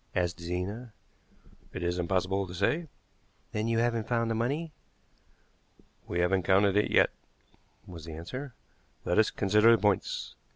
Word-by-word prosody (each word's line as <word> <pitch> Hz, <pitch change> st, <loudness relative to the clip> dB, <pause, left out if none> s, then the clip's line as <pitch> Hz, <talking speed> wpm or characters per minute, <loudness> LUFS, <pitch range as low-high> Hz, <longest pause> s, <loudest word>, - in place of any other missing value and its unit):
asked 90 Hz, -1 st, 0 dB
Zena. 95 Hz, +7 st, -4 dB, 0.8 s
"It 95 Hz, -, -4 dB
is 90 Hz, +1 st, -1 dB
impossible 95 Hz, +2 st, 0 dB
to 90 Hz, -, -8 dB
say." 160 Hz, -, 0 dB, 0.6 s
"Then 110 Hz, +1 st, -1 dB
you 115 Hz, 0 st, +1 dB
haven't 115 Hz, -1 st, 0 dB
found 115 Hz, -1 st, 0 dB
the -, -, +1 dB
money?" 140 Hz, +9 st, -1 dB, 1.4 s
"We 85 Hz, -, -1 dB
haven't 95 Hz, +2 st, +2 dB
counted 100 Hz, +2 st, +3 dB
it 105 Hz, -, +3 dB
yet," -, -, +4 dB, 0.7 s
was 85 Hz, -3 st, -10 dB
the 80 Hz, -, -7 dB
answer. 125 Hz, -, -7 dB, 0.5 s
"Let 90 Hz, -, +2 dB
as 110 Hz, -, +4 dB
consider 105 Hz, +3 st, +4 dB
the 115 Hz, -, +7 dB
points. 105 Hz, -3 st, 0 dB
100 Hz, 150 wpm, -29 LUFS, 90-115 Hz, 1.4 s, the